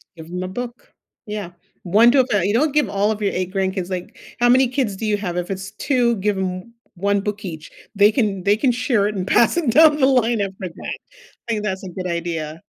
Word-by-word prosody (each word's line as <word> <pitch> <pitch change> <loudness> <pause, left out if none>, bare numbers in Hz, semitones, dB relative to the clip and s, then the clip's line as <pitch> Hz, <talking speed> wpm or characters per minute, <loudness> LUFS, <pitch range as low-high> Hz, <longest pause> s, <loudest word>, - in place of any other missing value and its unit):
Give 160 -1 -11
'em 180 +1 -4
a - - -3
book. 240 +5 -7 0.3
Yeah, 210 -4 -5 0.3
1 215 +7 +5
to 270 -1 +5
a - - -1
fa 205 -6 +1
you 205 - +1
don't 290 +5 +2
give 295 -9 +2
all 200 +2 +1
of 215 0 -4
your 200 - 0
8 185 +1 -3
grandkids, 190 -1 -1
like 180 -1 -6 0.2
how 245 - +4
many 255 +1 +5
kids 250 -6 -1
do 220 - -5
you 210 -1 +1
have? 180 -4 -4
If 180 +2 -3
it's 195 +1 -5
2, 240 0 +1
give 205 0 0
'em 185 +4 -4 0.2
1 200 +2 +1
book 210 +1 -4
each. 160 -3 -7 0.3
They 205 +2 +5
can 205 -5 -1
they 200 +1 +4
can 255 +1 +2
share 240 -4 +1
it 210 - -4
and 185 0 -3
pass 235 +11 +3
it 290 -9 +1
down 305 +1 +6
the 265 - +3
line 240 -4 +2
after 190 -2 -4
that. 165 - -7 0.5
I - - 0
think 210 -1 -2
that's 190 -1 -3
a - - -6
good 185 +1 -6
idea. 165 -2 -4
205 Hz, 245 wpm, -21 LUFS, 185-235 Hz, 0.5 s, down